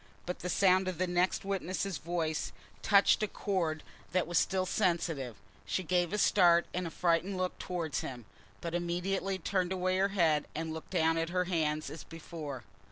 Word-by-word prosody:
But 180 Hz, -, -4 dB
the 180 Hz, -, -4 dB
sound 185 Hz, +1 st, +4 dB
of 185 Hz, -3 st, -2 dB
the 185 Hz, -, +1 dB
next 180 Hz, +2 st, +1 dB
witness's 195 Hz, -3 st, -2 dB
voice 160 Hz, 0 st, -2 dB, 0.3 s
touched 200 Hz, 0 st, +5 dB
a 215 Hz, -, +1 dB
chord 170 Hz, -7 st, -1 dB, 0.3 s
that 185 Hz, -2 st, +2 dB
was 175 Hz, 0 st, +2 dB
still 190 Hz, -1 st, +1 dB
sensitive, 165 Hz, -, 0 dB, 0.3 s
she 100 Hz, -, -2 dB
gave 175 Hz, 0 st, +1 dB
a 210 Hz, -, 0 dB
start 175 Hz, -4 st, +5 dB
and 180 Hz, -1 st, -2 dB
a -, -, -4 dB
frightened 175 Hz, +3 st, +1 dB
look 185 Hz, 0 st, -2 dB
towards 165 Hz, -6 st, -2 dB
him, 120 Hz, -4 st, -6 dB, 0.4 s
but 170 Hz, -, -4 dB
immediately 180 Hz, +3 st, -1 dB
turned 185 Hz, 0 st, -1 dB
away 185 Hz, 0 st, +1 dB
her 195 Hz, +1 st, +3 dB
head 165 Hz, -7 st, +2 dB
and 160 Hz, +1 st, -3 dB
looked 160 Hz, -, -8 dB
down 165 Hz, -2 st, +2 dB
at 165 Hz, 0 st, -1 dB
her 180 Hz, +1 st, +1 dB
hands 155 Hz, -4 st, -1 dB
as 155 Hz, -, -8 dB
before. 155 Hz, -5 st, -7 dB
175 Hz, 180 wpm, -32 LUFS, 160-185 Hz, 0.4 s, touched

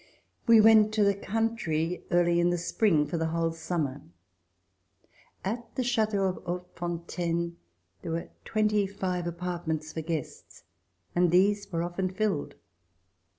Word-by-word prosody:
We 230 Hz, -1 st, +8 dB
went 215 Hz, -1 st, +7 dB
to 215 Hz, -, +4 dB
the 200 Hz, 0 st, +4 dB
country 195 Hz, -6 st, -1 dB
early 175 Hz, -1 st, +3 dB
in 175 Hz, 0 st, +3 dB
the 175 Hz, -, +1 dB
spring 170 Hz, -2 st, +2 dB
for 170 Hz, -, -3 dB
the 160 Hz, -, 0 dB
whole 165 Hz, 0 st, 0 dB
summer. 160 Hz, -4 st, -3 dB, 1.4 s
At 230 Hz, +4 st, -4 dB
the 255 Hz, -, 0 dB
chateau 215 Hz, -4 st, +1 dB
of 185 Hz, -1 st, -1 dB
Hautefontaine 170 Hz, -1 st, -3 dB, 0.4 s
there 165 Hz, -, -5 dB
were 165 Hz, -, -3 dB
twenty 210 Hz, -2 st, +1 dB
five 185 Hz, -3 st, -3 dB
apartments 170 Hz, -3 st, -3 dB
for 160 Hz, -, -3 dB
guests, 160 Hz, -2 st, -6 dB, 0.5 s
and 175 Hz, 0 st, +4 dB
these 200 Hz, +3 st, +3 dB
were 165 Hz, -1 st, -1 dB
often 175 Hz, +2 st, -2 dB
filled. 190 Hz, -5 st, -1 dB
175 Hz, 135 wpm, -28 LUFS, 170-205 Hz, 1.4 s, We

